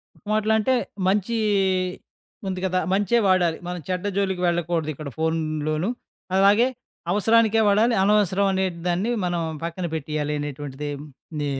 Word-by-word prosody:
ఒక - - -26
మాటలొ 215 0 +2
అంటే, 260 +5 +2 0.3
మంచి 205 +4 +1 1.1
ఉంది 185 -1 -2
గదా! 185 0 +1
మంచే 205 +3 +2
వాడాలి 180 -3 +3
మనం 180 0 -4
చెడ్డ 185 +2 -2
జోలికి 190 -2 0
వెళ్ళకూడదు 170 -2 0
ఇక్కడ 145 0 -7
ఫోనులోను. 155 +1 -1 0.5
అలాగే 205 +5 +5 0.4
అవసరానికే 225 +2 +3
వాడాలి, 225 +4 +3
అనవసరం 200 -1 +3
అనే 190 0 +1 0.2
దాన్ని 185 +7 0
మనం 175 -1 -1 0.2
పక్కన 170 +2 -3
పెట్టేయాలి 150 0 -2
అనేటువంటిది. 145 0 -5 0.5
ది 145 - -1
185 Hz, 130 wpm, -24 LUFS, 160-205 Hz, 1.1 s, అలాగే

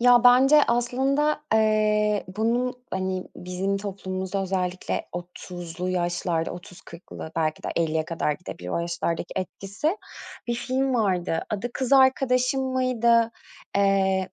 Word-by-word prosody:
Ya, 245 0 +6
bence 270 +4 +7
aslında, 270 +6 +1
eee, 215 -1 +2
bunun, 240 +3 +1 0.2
hani, 185 -1 -2
bizim 185 +2 -2
toplumumuzda 190 -1 -3
özellikle 185 -1 -2
30'lu 175 0 -6
yaşlarda, 175 -2 -1
30-40'lı 175 -2 -10
belki 155 -1 0
de - - -3
50'ye 160 -1 +1
kadar 165 -2 -1
gidebilir 140 - -8
o - - -1
yaşlardaki 170 0 -2
etkisi 195 - -2 0.5
bir 240 - +1
film 260 +2 0
vardı. 185 -7 +1
Adı 215 +3 -2
Kız 260 0 -2
Arkadaşım 260 -1 +4
mıydı, 235 -3 +3 0.5
eee, 190 -1 +2
195 Hz, 115 wpm, -25 LUFS, 180-245 Hz, 0.5 s, bence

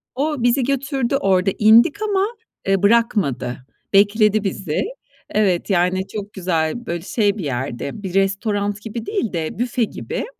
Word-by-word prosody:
O 290 -1 -1
bizi 245 +2 +3
götürdü, 275 0 -1
orada 195 -5 +2
indik, 230 - +5
ama, 405 -2 +1 0.4
ııı, 195 -1 +2
bırakmadı, 200 - +2 0.4
bekledi 210 +1 +4
bizi. 185 -5 -2 0.5
Evet, 195 -4 +1
yani, 185 0 +1
çok 205 -1 -7
güzel, 180 +4 -1
böyle 170 -4 -3
şey 205 0 0
bir 195 - -4
yerde, 135 - -4
bir 185 - -5
restoran 200 +1 0
gibi 225 +1 -6
değil 395 - -2
de, 165 +3 -3
büfe 245 0 0
gibi. 220 - -4
205 Hz, 145 wpm, -20 LUFS, 185-235 Hz, 0.5 s, indik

